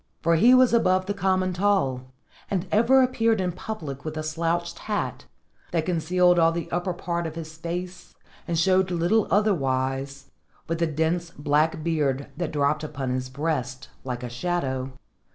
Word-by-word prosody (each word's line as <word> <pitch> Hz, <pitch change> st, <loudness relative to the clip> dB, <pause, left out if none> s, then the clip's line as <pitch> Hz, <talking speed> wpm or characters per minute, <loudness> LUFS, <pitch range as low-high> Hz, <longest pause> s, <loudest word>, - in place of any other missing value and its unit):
For 165 Hz, 0 st, +4 dB
he 235 Hz, +10 st, +6 dB
was 255 Hz, -2 st, +5 dB
above 185 Hz, -5 st, +3 dB
the 205 Hz, -, -2 dB
common 185 Hz, -2 st, +1 dB
tall, 155 Hz, -10 st, 0 dB, 0.4 s
and 190 Hz, -2 st, -1 dB
ever 245 Hz, +5 st, +5 dB
appeared 230 Hz, -4 st, +1 dB
in 180 Hz, -1 st, 0 dB
public 165 Hz, -, -6 dB
with 155 Hz, 0 st, -5 dB
a 155 Hz, -, -3 dB
slouched 170 Hz, +2 st, -2 dB
hat, 210 Hz, -, -2 dB, 0.5 s
that 165 Hz, -2 st, 0 dB
concealed 180 Hz, +1 st, +3 dB
all 165 Hz, 0 st, +5 dB
the 170 Hz, 0 st, -5 dB
upper 175 Hz, +2 st, -1 dB
part 170 Hz, -1 st, -3 dB
of 160 Hz, -, -8 dB
his 160 Hz, -1 st, -7 dB
face 175 Hz, +3 st, -6 dB, 0.3 s
and 170 Hz, -1 st, -1 dB
showed 185 Hz, +2 st, +3 dB
little 180 Hz, +5 st, +2 dB
otherwise 135 Hz, -8 st, 0 dB, 0.3 s
but 165 Hz, 0 st, -3 dB
the 170 Hz, -, +2 dB
dense 160 Hz, +3 st, -1 dB
black 150 Hz, +1 st, 0 dB
beard 145 Hz, -4 st, 0 dB
that 170 Hz, +1 st, -3 dB
dropped 150 Hz, +1 st, +1 dB
upon 135 Hz, -4 st, -4 dB
his 130 Hz, 0 st, -2 dB
breast 135 Hz, -2 st, -3 dB
like 125 Hz, -1 st, -5 dB
a -, -, -3 dB
shadow. 135 Hz, -3 st, -2 dB
165 Hz, 165 wpm, -25 LUFS, 145-185 Hz, 0.5 s, he